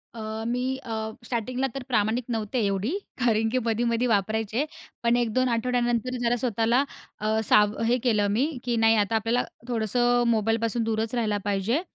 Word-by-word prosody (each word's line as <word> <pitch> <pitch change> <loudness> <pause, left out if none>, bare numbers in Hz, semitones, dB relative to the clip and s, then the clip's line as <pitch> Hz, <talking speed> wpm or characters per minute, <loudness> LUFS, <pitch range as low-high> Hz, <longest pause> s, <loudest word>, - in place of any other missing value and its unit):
अ, 220 0 -5
मी 250 +2 -1
अ, 220 -4 -4
स्टार्टिंगला 250 +3 -1
तर 270 - -4
प्रामाणिक 225 +1 +1
नव्हते 225 +1 -1
एवढी, 200 - -1 0.2
कारण 225 -3 +2
की 255 - +1
मधी-मधी 235 +1 +1
वापरायचे, 220 +4 0 0.4
पण 235 0 +3
1-2 245 +2 +1
आठवड्यानंतर 240 +1 0
जरा 240 0 +2
स्वतःला 235 +2 +2 0.4
अ, 215 +1 +1
साव 210 0 +5
हे 245 +2 +3
केलं 215 -5 +2
मी 240 +7 +2 0.2
की 240 -1 0
नाही, 225 0 +5
आता 210 +1 +1
आपल्याला 225 +3 +1 0.2
थोडंसं 240 +1 +2
मोबाईलपासून 225 +1 +1
दूरच 225 +1 -1
राहिला 215 -4 0
पाहिजे 205 - 0
230 Hz, 155 wpm, -26 LUFS, 220-245 Hz, 0.4 s, साव